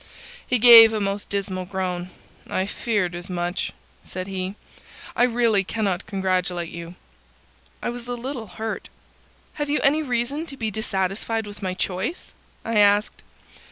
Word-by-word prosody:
He 250 - +2
gave 230 -1 +10
a 215 - 0
most 200 0 -2
dismal 190 -2 -2
groan. 180 -1 -3 0.4
"I 185 - 0
feared 205 -3 -1
as 175 +2 -7
much," 175 0 -2 0.3
said 185 0 -6
he. 190 0 -4 0.6
"I - - 0
really 230 -4 +2
cannot 195 -2 -2
congratulate 185 -3 -1
you." 170 +1 -8 0.9
I - - -1
was 240 0 -8
a 245 - -2
little 240 -1 -5
hurt. 220 +4 -5 0.7
"Have 295 - -1
you 295 - +2
any 300 +2 +4
reason 275 +4 -2
to 275 - -7
be 220 -3 -2
dissatisfied 210 +2 -2
with 205 0 -10
my 185 -2 -2
choice?" 190 - -3 0.3
I 225 -2 +1
asked. 205 +1 +3
205 Hz, 150 wpm, -23 LUFS, 185-235 Hz, 0.9 s, gave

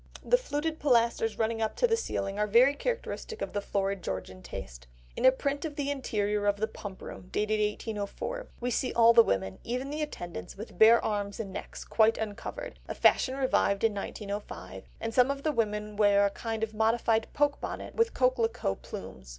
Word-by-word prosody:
The - - +5
fluted 320 -10 -2
pilasters 235 -4 +2
running 225 0 0
up 220 -1 -1
to - - +3
the 455 -1 +3
ceiling 200 - -3
are 210 - +2
very 240 +6 +6
characteristic 465 +4 -4
of - - -4
the 205 - -1
florid 195 -1 -1
Georgian 95 0 -5
taste. - - -8 0.3
In - - -1
a 260 - +9
print 280 +2 -2
of 310 -3 -4
the 285 -1 -1
interior 210 -6 -1
of 205 0 +2
the 220 +2 0
Pump 195 -3 -9
Room, 185 - -9
dated 215 +1 0
1804, 210 - -3
we 245 0 -2
see 255 - 0
all 230 0 +6
the 230 - +9
women, 95 - -1
even 255 +4 -3
the 305 +1 -3
attendants, 175 - -6
with 210 -3 -9
bare 230 +2 +7
arms 205 -1 -2
and 195 -4 -5
necks, - - -7
quite 220 0 +3
uncovered,—a 215 -2 -6
fashion 260 - +3
revived 255 -7 +1
in 225 -2 +3
1905,—and 205 +2 -6
some 250 +2 +5
of 280 0 -3
the 310 - +2
women 210 -4 -1
wear 205 -1 +4
a 200 - +1
kind 225 +1 -4
of 220 -1 -2
modified 225 0 +2
poke 290 0 +1
bonnet - - -5
with 460 0 +1
"coquelicot" 240 - +1
plumes. 65 -1 -9
225 Hz, 190 wpm, -29 LUFS, 205-260 Hz, 0.3 s, a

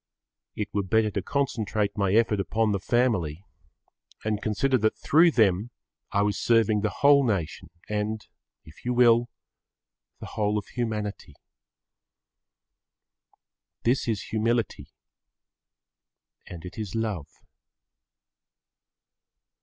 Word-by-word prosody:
It 105 -1 -4
were 100 - +1
better 110 +3 +1
to 100 - -2
concentrate 110 -4 -1
my 100 -2 +1
effort 110 -2 +3
upon 110 +2 0
the 100 - 0
family 100 -8 0 0.8
and 105 -1 -1
consider 120 +5 +1
that 110 0 +1
through 165 +4 +5
them 110 - +2 0.4
I 100 - +2
was 105 0 0
serving 110 -3 +3
the 105 - 0
whole 140 +2 +4
nation 100 - -2 0.2
and, 105 +1 -2 0.4
if 80 - -16
you 125 0 -1
will, 120 -1 +5 0.9
the - - -8
whole 105 0 -1
of 105 - -3
humanity. 110 -4 -4 2.5
This 125 +2 +1
is 110 -4 -1
humility 115 0 -1 1.6
and 85 -1 -9
it 90 - -9
is 105 -3 -5
love. 105 -9 -2
110 Hz, 110 wpm, -26 LUFS, 100-115 Hz, 2.5 s, through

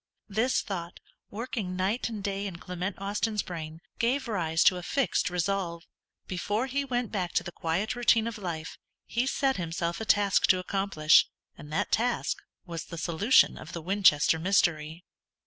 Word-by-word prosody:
This 225 +6 +1
thought, 175 -3 -5 0.3
working 210 -4 -4
night 195 +7 0
and 215 -3 -6
day 200 0 -2
in 185 - -6
Clement 180 +2 -5
Austin's 205 +2 -1
brain, 160 -2 -7 0.2
gave 260 +3 +1
rise 165 -7 +1
to 185 - +5
a - - -5
fixed 190 0 0
resolve. 180 -1 -2 0.4
Before 205 +6 -1
he 275 +2 -1
went 245 -3 -2
back 185 -5 -2
to - - +1
the 175 - -6
quiet 175 +9 -2
routine 230 -2 +3
of 230 -2 -4
life, 165 -5 -5 0.3
he 240 +2 -1
set 270 0 +1
himself 170 +1 -3
a - - -3
task 205 -2 +3
to 185 - +5
accomplish, 185 -4 +3 0.3
and 150 - -12
that 155 - -1
task 240 +2 +1 0.3
was 170 -3 -6
the 170 - -8
solution 170 +9 +3
of 165 - -10
the 170 - -5
Winchester 180 -4 +4
mystery. 165 -3 +1
190 Hz, 165 wpm, -28 LUFS, 170-220 Hz, 0.4 s, to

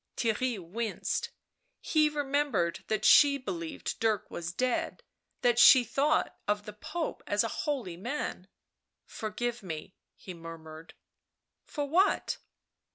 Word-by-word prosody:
Theirry 235 +1 0
winced; 210 +6 -3 0.5
he 305 -1 +3
remembered 285 - 0
that 215 - -1
she 285 -1 +7
believed 180 -10 -5
Dirk 220 -3 0
was 170 0 -4
dead, 255 - -1 0.4
that 240 -1 +4
she 255 0 +9
thought 285 +6 +1
of 205 0 0
the 210 - -7
Pope 315 +10 -4
as - - +2
a - - 0 0.2
holy 235 -13 -2
man.... 235 -3 -4 0.3
" - - -57
Porgive 235 +2 -3
me," 165 -1 -7 0.2
he 185 - -9
murmured. 165 -1 -10 0.4
" - - -57
For 290 - -3
what 365 +7 +2
225 Hz, 130 wpm, -30 LUFS, 180-280 Hz, 0.5 s, she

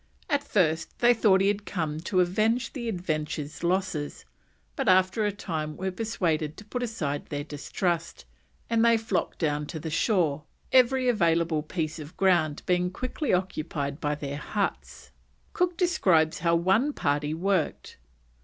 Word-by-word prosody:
At 285 -1 +2
first 165 - 0
they 240 0 +5
thought 205 -5 +4
he 195 - +3
had 205 0 0
come 160 -6 -3
to 180 +3 +1
avenge 215 +7 +1
the 235 -4 -4
Adventure's 155 -5 -3
losses, 175 -4 -1 0.5
but - - 0
after 185 +3 +4
a - - 0
time 155 -6 -4
were 190 +1 -2
persuaded 170 -7 -1
to 210 - -11
put 245 +4 -4
aside 165 -12 -3
their 145 -1 -4
distrust, 165 - -3 0.4
and 230 -1 +2
they 230 -1 +5
flocked 215 -6 -2
down 150 -2 -1
to 160 - -6
the 160 +1 -5
shore, 160 -5 +1 0.3
every 255 0 +4
available 170 -7 +2
piece 155 0 -3
of 155 +3 -10
ground 170 -6 +2
being 180 0 +1
quickly 255 +9 -3
occupied 155 -6 -2
by 150 -1 0
their 145 -1 -5
huts. 200 +6 -4 0.4
Cook 355 -1 0
describes 185 - +2
how 170 0 +2
one 190 +12 +2
party 145 - 0
worked. 185 -1 -1
180 Hz, 155 wpm, -27 LUFS, 155-210 Hz, 0.5 s, they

